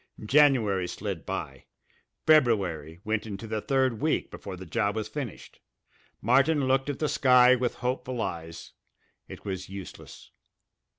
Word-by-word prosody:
January 115 -9 +3
slid 95 -3 -5
by; 65 -1 -5 0.6
February 95 - +2
went 110 +1 -2
into 105 +1 -6
the 110 -1 -3
third 130 -3 0
week 155 +1 0
before 95 -2 -8
the 95 - -9
job 105 +3 -1
was 110 -1 -3
finished. 135 -9 -7 0.6
Martin 135 +5 +3
looked 135 +1 +1
at 140 - -3
the 155 - 0
sky 125 -3 +5
with 125 -1 -1
hopeful 125 0 -3
eyes. 85 -6 -5 0.6
It - - -11
was 95 -2 -5
useless. 95 -1 -10
115 Hz, 135 wpm, -27 LUFS, 95-130 Hz, 0.6 s, sky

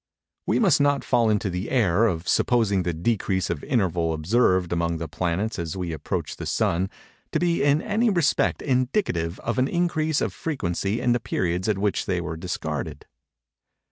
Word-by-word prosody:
We - - +2
must 180 - +4
not 145 -1 +2
fall 120 -3 +2
into 105 -1 +1
the 90 +5 -3
error 110 -3 +3
of 85 -4 -3
supposing 110 -6 +2
the 90 0 -1
decrease 95 +2 -1
of 80 -4 -4
interval 90 -9 0
observed 90 +1 +2
among 85 -1 0
the 80 0 -4
planets 90 +7 -2
as 85 +1 -4
we 90 -2 -3
approach 75 - -4
the - - -5
Sun, 90 +3 0 0.4
to 155 - +2
be 170 0 +1
in 145 +3 +3
any 220 +3 +1
respect 175 -7 +1
indicative 125 - 0
of 115 +2 -2
an 130 - +3
increase 160 -3 0
of - - -1
frequency 105 - -2
in 125 - +1
the 120 - +2
periods 90 -3 -1
at 105 - +1
which 100 0 -1
they 90 -2 0
were 80 -2 -4
discarded. 80 -3 -4
100 Hz, 175 wpm, -24 LUFS, 85-130 Hz, 0.4 s, must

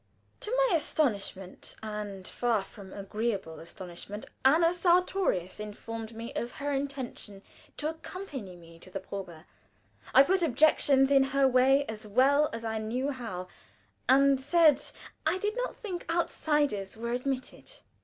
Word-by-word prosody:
To - - -4
my - - +3
astonishment 200 - -2
and 210 -3 -5
far 235 -5 0
from 195 -1 -12
agreeable 200 -5 -3
astonishment 180 +4 -8 0.2
Anna 330 +6 +5
Sartorius 350 - +1
informed 220 +2 -7
me 230 +1 -6
of 240 - -3
her 285 -1 -3
intention 265 -7 -5 0.3
to 300 - -1
accompany 305 - -8
me 165 -1 -15
to 185 - -15
the 195 - -4
probe. 185 -4 -8 0.7
I 270 - +10
put 375 +6 +2
objections 280 -2 +4
in 275 -1 +6
her 270 0 +3
way 265 +2 +4
as 220 -2 -7
well 275 +7 +4
as 230 0 -5
I 220 -1 -1
knew 250 +6 -1
how, 195 -9 -6 0.6
and 275 0 +5
said 295 0 +5 0.5
I 335 +4 +2
did 415 +3 -2
not - - -2
think 365 -7 -6
outsiders 295 - 0
were 235 +1 -3
admitted. 255 - -3
255 Hz, 140 wpm, -29 LUFS, 205-295 Hz, 0.7 s, I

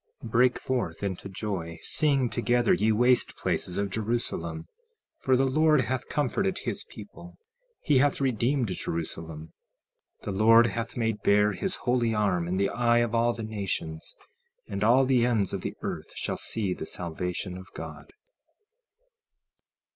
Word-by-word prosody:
16:19 115 - -7
Break 125 +2 +3
forth 120 -10 -2
into 100 0 -4
joy, 90 -5 -4
sing 140 -5 +2
together, 120 0 +2
ye 110 +2 +2
waste 125 +3 +3
places 90 - -2
of 100 -1 -1
Jerusalem; 105 -8 -2 0.5
for 130 -1 +2
the 135 - +3
Lord 155 +2 +4
hath 130 +1 -3
comforted 185 +7 0
his - - -3
people, - - -12 0.5
he 145 -4 +4
hath 145 +1 +2
redeemed 130 -1 +1
Jerusalem. 80 -2 -4 0.7
16:20 - - -28
The - - -3
Lord 115 +4 +6
hath 115 0 -3
made 110 -3 -1
bare 105 +1 +4
his 190 - -1
holy 120 -3 0
arm 95 -5 +1
in 90 +2 -1
the 100 0 +2
eye 120 -1 +2
of 120 -1 +1
all 120 +1 +2
the 115 -1 -6
nations; 100 -7 -4 0.5
and 100 +1 -3
all 125 +5 +5
the 130 -2 +3
ends 115 -5 +1
of - - -3
the - - -4
earth - - -5
shall - - -2
see 100 -5 -2
the - - -6
salvation 90 +2 -4
of 95 +1 -10
God. - - -8
115 Hz, 155 wpm, -27 LUFS, 95-125 Hz, 0.7 s, Lord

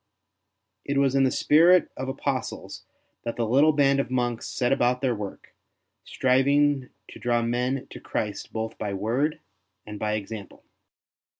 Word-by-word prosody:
It 140 - -2
was 135 -1 +3
in 135 -1 +4
the - - +3
spirit 170 +7 +4
of 130 +1 -4
apostles 135 -2 -4 0.4
that 115 - -4
the 120 - -1
little 140 +7 +4
band 140 -2 +3
of 135 - -1
monks 120 -2 -1
set 125 -1 0
about 125 -1 +1
their 130 -3 +1
work, 105 -3 -8 0.5
striving 135 +1 +2 0.2
to - - -11
draw 120 -1 +1
men 125 +3 -1
to - - -8
Christ 105 -2 -4
both 110 0 -4
by 100 -2 -3
word 125 +10 -1 0.4
and 105 -1 -8
by 105 0 -1
example. 105 -1 -6
125 Hz, 155 wpm, -25 LUFS, 115-140 Hz, 0.5 s, in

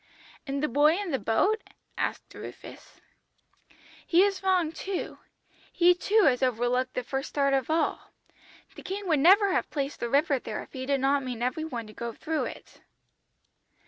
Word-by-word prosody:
"'And 275 +1 -2
the - - +3
boy 295 +6 +4
in 400 -4 -4
the 265 - 0
boat?' 380 - +1 0.3
asked - - -3
Rufus. - - -11 1.0
"'He 350 +2 +4
is 395 -2 0
wrong 370 -4 +2
too, 375 +3 -5 0.5
he 355 +1 +5
too 410 +4 +2
has 260 -6 +3
overlooked 250 +1 0
the 250 - -1
first 270 +3 -4
start 275 -1 +1
of 270 0 0
all. 320 +1 -1 0.6
The - - -10
King 390 +1 -5
would 310 -3 +3
never 390 +6 +6
have - - 0
placed 280 -1 -3
the 235 - -3
river 280 +1 +2
there 215 - -5
if - - -19
He 260 -1 -5
did 275 -1 +1
not 275 +1 +2
mean 250 -3 -5
every 255 +6 -1
one 240 -7 -5
to 215 - -13
go 235 +2 -5
through 315 +5 -2
it.' - - -10
285 Hz, 175 wpm, -27 LUFS, 255-355 Hz, 1.0 s, never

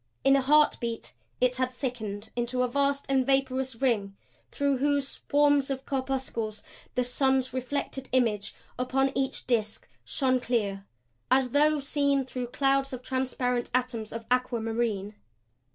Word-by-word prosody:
In 270 0 +6
a 275 - +3
heart 300 +3 +4
beat 235 -1 -4 0.3
it 250 0 +2
had 255 0 +1
thickened 220 -5 -5
into 245 +1 0
a - - +2
vast 280 +2 0
and 270 -1 +3
vaporous 265 -1 0
ring 225 -6 0 0.3
through 280 -2 0
whose 285 0 +1
swarms 285 -1 +2
of 270 -1 -3
corpuscles 260 -5 -2 0.3
the 250 - +2
sun's 260 0 +1
reflected 265 +1 -3
image 225 -6 +1 0.2
upon 265 +2 +1
each 265 -1 -2
disk 220 -4 -1 0.2
shone 255 -2 +1
clear 205 -5 -1 0.4
as 255 -1 +3
though 300 +2 +4
seen 280 -1 +1
through 250 -1 -4
clouds 275 +1 +1
of 255 0 -6
transparent 250 -2 -1
atoms 240 -4 -1
of 230 0 -6
aquamarine. 225 -4 0
255 Hz, 140 wpm, -28 LUFS, 235-270 Hz, 0.4 s, In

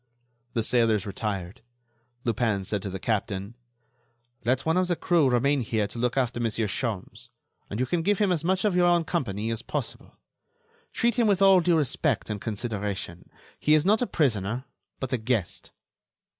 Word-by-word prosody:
The 115 - 0
sailors 115 -3 +2
retired. 100 -2 -4 0.6
Lupin 110 -4 0
said 100 +1 -2
to 100 - -4
the 95 - -4
captain: 100 0 -2 0.9
"Let 130 +2 +1
one 160 +1 +2
of 185 0 +2
the 175 - +1
crew 165 -5 +2
remain 135 +3 +2
here 110 -2 0
to 115 - -7
look 125 +2 0
after 125 -2 0
Monsieur 115 -1 0
Sholmes, 105 -2 -4 0.4
and 105 - -4
you 130 - +2
can 165 +6 0
give 205 +4 +2
him 205 -2 +2
as 165 -3 0
much 190 +3 +1
of 205 -4 +2
your 175 -1 +4
own 175 -1 +4
company 115 - -2
as 115 0 -3
possible. - - -5 0.8
Treat 235 0 +1
him 230 - +4
with 200 -3 +3
all 195 -1 +7
due 175 -1 +3
respect 140 -5 0
and 105 -2 -4
consideration. 105 -5 -4 0.3
He 150 - +4
is 155 +1 +2
not 215 +4 +4
a 245 - +1
prisoner, 120 - 0 0.3
but 130 -1 -3
a 125 - +1
guest. 110 -5 -2
120 Hz, 180 wpm, -26 LUFS, 105-165 Hz, 0.9 s, all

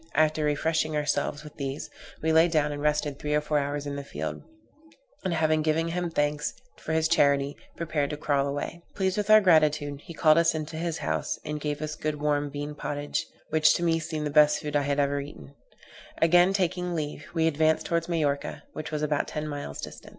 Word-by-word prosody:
After 155 0 +3
refreshing 155 +1 0
ourselves 145 0 -1
with 150 - -12
these, 140 0 -4 0.4
we 160 0 +2
lay 160 +2 +6
down 155 -3 +1
and 145 0 -5
rested 150 -1 0
three 150 0 -1
or - - +4
four 150 0 +1
hours 145 +1 -3
in 140 0 -4
the 140 - -5
field; 80 - -5 0.8
and, 185 - -1
having 155 -1 +2
given 160 +2 +1
him 175 +1 -2
thanks 150 -1 -1 0.2
for 160 - -4
his 160 0 +2
charity, 140 -2 +3 0.2
prepared 155 -4 -1
to 150 - -4
crawl 140 -2 +1
away. 145 +4 -4
Pleased 190 -1 0
with 210 0 -2
our 215 0 +9
gratitude, 150 -5 +3
he 170 - -10
called 155 0 +5
us 170 -1 +3
into 155 0 -4
his 165 0 -2
house, 80 -1 -2
and 150 -1 -4
gave 150 0 -3
us 155 0 -3
good 150 -1 -3
warm 145 -1 0
bean 145 +1 -5
pottage, 145 0 -3 0.2
which 155 0 +5
to 175 - -1
me 165 -1 +2
seemed 155 -1 -4
the 150 - -2
best 150 0 +5
food 150 -1 -4
I 145 - +4
had 140 0 0
ever 140 0 +1
ate. 145 +1 -9 0.8
Again 175 +3 +5
taking 180 -2 -1
leave, 150 -2 -4
we 160 -1 +2
advanced 160 0 +2
towards 170 0 -1
Majorca, 145 -4 -1
which 155 0 -5
was 150 -1 -3
about 150 -1 0
ten 150 0 -4
miles 145 - -6
distant. - - -9
150 Hz, 210 wpm, -27 LUFS, 145-160 Hz, 0.8 s, our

